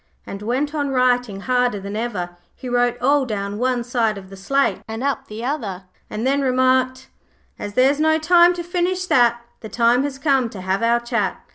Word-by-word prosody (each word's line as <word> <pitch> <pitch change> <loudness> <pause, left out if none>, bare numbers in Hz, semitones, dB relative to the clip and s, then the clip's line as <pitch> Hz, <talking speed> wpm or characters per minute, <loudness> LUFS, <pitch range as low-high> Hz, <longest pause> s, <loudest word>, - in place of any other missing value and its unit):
and 200 - -7
went 260 +7 -1
on 290 -2 -1
writing 245 -6 +1
harder 250 -3 +1
than 200 +1 -6
ever. 210 -6 -3 0.2
He 255 - -9
wrote 245 0 +1
all 280 +2 +3
down 205 -3 -4
one 250 -1 0
side 235 -3 0
of 190 -1 -11
the - - -9
slate 275 +9 0
and 225 +3 -5
all 280 - +3
up - - -9
the 220 +3 -6
other, 215 -10 -3 0.3
and 215 +3 -4
then 275 +2 +2
remarked 260 0 +1 0.5
'As 205 0 -6
there's 270 +3 +3
no 315 0 +3
time 345 +2 +5
to 345 - -5
finish 360 +1 -1
that, 240 -6 +3 0.2
The 220 - -9
time 235 +2 +3
has 280 -1 -3
come 270 -4 +1
to 200 -4 -9
have 190 +2 -1
our 235 +1 +2
chat. 235 -5 -2
245 Hz, 205 wpm, -21 LUFS, 220-275 Hz, 0.5 s, time